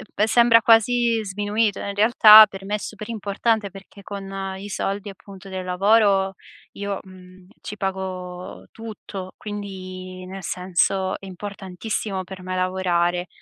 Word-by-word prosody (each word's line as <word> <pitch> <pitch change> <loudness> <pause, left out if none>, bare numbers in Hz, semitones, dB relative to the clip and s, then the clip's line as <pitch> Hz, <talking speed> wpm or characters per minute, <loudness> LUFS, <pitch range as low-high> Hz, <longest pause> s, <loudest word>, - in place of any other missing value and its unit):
pe 210 - +2
sembra 235 0 +5
quasi 230 0 +3
sminuito, 205 +2 -1
in 200 - -4
realtà 215 0 +9
per 195 -1 -10
me 205 +2 -1
è - - 0
super 215 +1 -8
importante 220 0 -1
perché 195 +1 -14
con 195 -1 -6
i 200 +2 -8
soldi, 200 +1 -3
appunto, 195 0 -12
del 185 -1 -5
lavoro 195 +1 +3 0.4
io, 200 -1 -4
mhmm, 185 -1 -16
ci 210 - -7
pago 185 -2 -5
tutto. 210 -4 -8
Quindi 185 -3 -7
nel 190 0 -8
senso, 185 +2 0
è - - -12
importantissimo 195 +1 -5
per 185 0 -10
me 185 0 -4
lavorare. 180 -1 0
195 Hz, 140 wpm, -22 LUFS, 185-210 Hz, 0.4 s, realtà